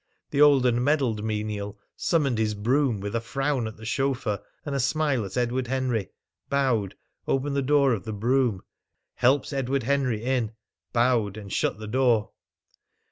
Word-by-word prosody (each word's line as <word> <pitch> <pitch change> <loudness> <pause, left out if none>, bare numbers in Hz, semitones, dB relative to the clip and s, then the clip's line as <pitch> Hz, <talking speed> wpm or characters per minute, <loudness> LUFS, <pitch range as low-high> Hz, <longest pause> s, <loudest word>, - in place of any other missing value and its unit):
The 140 - +2
old 140 -3 +6
and 120 0 +2
medalled 130 -7 +1
menial 105 -1 -3 0.2
summoned 140 -9 +1
his 105 -1 0
brougham 120 +1 +1
with 100 +2 -4
a 115 - 0
frown 135 0 -1
at 110 - -8
the 110 - -11
chauffeur 125 -3 -1 0.2
and 145 - -3
a 140 - 0
smile 140 -2 +1
at 95 +3 -6
Edward 125 +1 0
Henry, 125 -5 -1 0.4
bowed, 130 -8 +1 0.3
opened 140 +1 0
the 140 - +2
door 140 -1 +3
of 100 -6 -3
the 110 - -4
brougham, 115 -1 +1 0.5
helped 135 +4 +2
Edward 135 -1 -1
Henry 130 -4 0
in, 120 -3 0 0.4
bowed, 115 -4 +2
and 100 -2 -8
shut - - 0
the 110 - -8
door. 120 -1 +2
125 Hz, 165 wpm, -26 LUFS, 110-135 Hz, 0.5 s, old